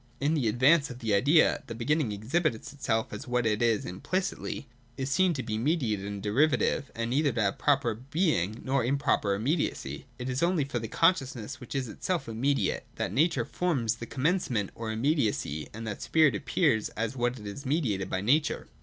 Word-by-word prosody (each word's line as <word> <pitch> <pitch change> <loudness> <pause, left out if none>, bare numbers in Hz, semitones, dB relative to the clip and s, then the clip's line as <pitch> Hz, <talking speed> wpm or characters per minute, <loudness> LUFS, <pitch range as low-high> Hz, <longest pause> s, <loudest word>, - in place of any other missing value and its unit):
In 145 +4 +1
the 140 -8 +1
advance 140 +7 +4
of 125 - -7
the 115 -4 -1
idea, 145 +11 +4
the - - -6
beginning 135 +1 0
exhibits 130 - -1
itself 115 -5 -1
as 140 - -7
what 125 -1 0
it 110 0 +1
is 115 -3 +2
implicitly. 155 - -3 0.3
It 135 - -2
is 135 - -3
seen 185 +1 +3
to 130 - -3
be 110 -2 -3
mediated 115 - 0
and 100 -1 -5
deriva 125 +7 +3
tive, 135 - 0
and 115 +1 -2
neither 145 +2 +2
to 115 - 0
have 100 - 0
proper 135 -5 +2
being 125 - -1
nor 135 0 +2 0.2
proper 100 -7 +1
imme 140 - +1
diacy. - - -3
It 125 - -5
is 130 +1 -2
only 170 -3 +2
for 135 -3 -3
the 115 - -5
consciousness 135 - +1
which 125 - -8
is 135 -2 -1
itself 175 +7 -3
immediate, 130 +5 0
that 90 - -3
Nature 135 -2 +2
forms 125 -11 0
the 115 - -7
commencement 130 - 0
or 115 -1 -5
im 110 +2 -4
mediacy, 110 - 0
and 115 +1 -7
that 110 -2 -5
Spirit 155 -4 +4
appears 140 - +1
as 115 +3 -2
what 120 0 0
is 105 +6 -7
mediated 125 - 0
by 95 - -1
Nature. 145 +9 +1
125 Hz, 200 wpm, -29 LUFS, 110-150 Hz, 0.3 s, advance